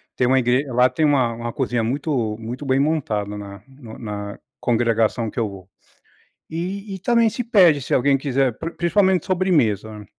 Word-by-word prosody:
tem 125 - +1
uma 130 +1 +4
igre 125 +3 +1
lá 125 0 +3
tem 155 - 0
uma 130 -5 +2
uma 120 0 -5
cozinha 120 -4 -1
muito 120 -3 -1
muito 120 +5 -6
bem 130 0 +2
montada 110 -9 -1
na 100 -1 -9
no 130 -5 -12
na 105 -2 -6 0.2
congregação 115 -1 +1
que 105 - -5
eu 110 -2 0
vou. 95 -1 -12 0.8
E 195 +5 -5
e - - -9
também 235 +3 +3
se 245 - -4
pede, 185 - +4
se - - -3
alguém 135 +2 +3
quiser, 135 -3 0
pri 165 - -5
principalmente 185 0 +1
sobremesa, 110 - 0
130 Hz, 175 wpm, -21 LUFS, 110-160 Hz, 0.8 s, uma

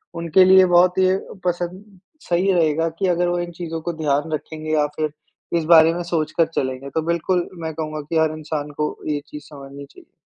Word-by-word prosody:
उनके 170 +2 +4
लिए 190 0 +7
बहुत 180 +1 +4
ये 185 0 +3 0.3
पसंद 180 +3 -4 0.3
सही 180 +3 +2
रहेगा 165 -2 +2
कि 195 - +1
अगर 175 0 +1
वो 175 0 -1
इन 175 0 -4
चीज़ों 165 -1 -6
को 175 +1 -4
ध्यान 155 0 -1
रखेंगे 155 0 -5
या 150 -1 +3
फिर 155 -1 -2 0.5
इस 165 - -1
बारे 160 0 +7
में 175 - -3
सोच 165 -3 -2
कर 165 - +5
चलेंगे। 130 +1 -3
तो 160 - -1
बिल्कुल 170 +1 0
मैं 160 0 -4
कहूँगा 155 -1 -4
कि 165 - 0
हर 155 0 +1
इंसान 150 -1 -5
को 150 0 -1
ये 145 -1 -1
चीज़ 150 - -8
समझनी 140 -1 -10
चाहिए। - - -19
165 Hz, 205 wpm, -21 LUFS, 155-175 Hz, 0.5 s, लिए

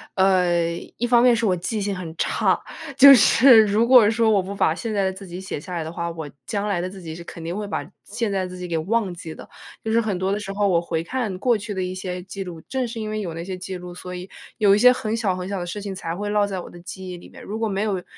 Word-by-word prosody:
呃， 180 -3 +3 0.3
一 240 - -1
方 240 0 +5
面 250 -1 +6
是 230 -1 0
我 185 -3 +2
记 205 +5 -3
性 200 -1 -2
很 170 -3 -7
差， - - +1 0.4
就 275 +1 +11
是 235 -1 +7
如 215 +3 +2
果 245 -5 +7
说 225 0 +2
我 205 -3 +4
不 195 - -6
把 160 -5 +1
现 220 +3 -4
在 200 - +1
的 190 - -1
自 195 +1 -10
己 180 0 -8
写 190 -5 -5
下 180 +3 -9
来 165 -2 -2
的 160 - -6
话， 170 0 -3
我 160 -3 -7 0.2
将 205 0 -2
来 185 -4 0
的 185 - -3
自 190 0 -11
己 160 -2 -7
是 170 - -9
肯 170 - -10
定 170 +3 -4
会 210 - -3
把 205 - -4
现 220 +2 -3
在 195 -1 -1
的 - - -3
自 180 - -9
己 180 0 -6
给 165 - -1
忘 195 +3 0
记 165 -2 -8
的。 - - -12 0.3
就 220 - -4
是 230 +1 +3
很 205 -5 -2
多 190 +1 0
的 205 - -1
时 195 -1 -6
候 200 0 +1
我 170 -3 +3
回 165 -2 -2
看 210 0 -3
过 240 +1 +2
去 210 0 -6
的 190 - -3
一 185 0 -3
些 180 -1 -5
记 195 +1 -6
录， 175 -3 -8
正 260 -2 -1
是 230 -1 -6
因 215 -1 -4
为 215 0 -3
有 170 -4 -4
那 165 - -6
些 185 +2 -5
记 185 0 -6
录， 180 0 -9
所 180 0 -8
以 180 +1 -7 0.3
有 205 -3 +5
一 - - +2
些 250 +4 +7
很 225 -3 -2
小 215 -5 0
很 180 0 -5
小 200 -1 -3
的 175 - -4
事 200 +4 -5
情， 195 -1 -5
才 165 -3 -4
会 205 +4 -4
落 205 0 +2
在 195 -2 -4
我 - - -8
的 - - -13
记 185 +1 -8
忆 180 - -5
里 175 - -13
面。 - - -14
如 215 +2 -5
果 225 -1 -1
没 195 +1 -1
有 195 -4 -2
195 Hz, 330 characters per minute, -23 LUFS, 180-215 Hz, 0.4 s, 就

